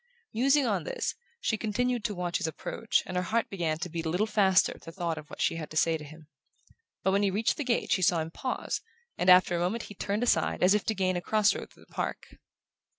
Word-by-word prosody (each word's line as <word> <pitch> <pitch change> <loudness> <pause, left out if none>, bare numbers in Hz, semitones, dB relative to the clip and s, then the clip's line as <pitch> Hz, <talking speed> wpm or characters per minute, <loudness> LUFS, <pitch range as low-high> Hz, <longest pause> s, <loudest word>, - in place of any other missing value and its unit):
Musing 270 +5 +3
on - - 0
this, - - -2 0.3
she 220 - 0
continued 240 +2 0
to 210 - -1
watch 175 -1 -1
his - - -2
approach; 205 +7 -1
and 185 - -6
her 180 - +2
heart 225 +5 -1
began 165 -5 -1
to 160 - -4
beat 165 -1 -4
a - - 0
little 180 +6 +1
faster 200 -3 +3
at - - -17
the 165 - -9
thought 170 -2 -2
of 150 -1 -13
what - - -10
she - - +1
had 155 -2 -6
to 155 - -5
say 165 +1 +3
to 155 - -6
him. 155 +1 -13 0.8
But 190 - +3
when 200 +1 +2
he 200 - +3
reached 210 +4 +1
the 295 - -3
gate 245 -3 0
she 190 - +3
saw 175 -1 +3
him 160 +1 -4
pause, 255 +8 -3 0.3
and 180 - +1
after 180 -1 +7
a - - 0
moment 185 +7 -1
he - - -9
turned 205 +3 -2
aside 245 - +1
as 185 +2 +6
if 210 - +1
to 220 - 0
gain 185 -2 +1
a - - -2
cross 215 +3 +3
road - - -7
through - - -19
the - - -26
park. - - -4
190 Hz, 260 wpm, -29 LUFS, 170-220 Hz, 0.8 s, after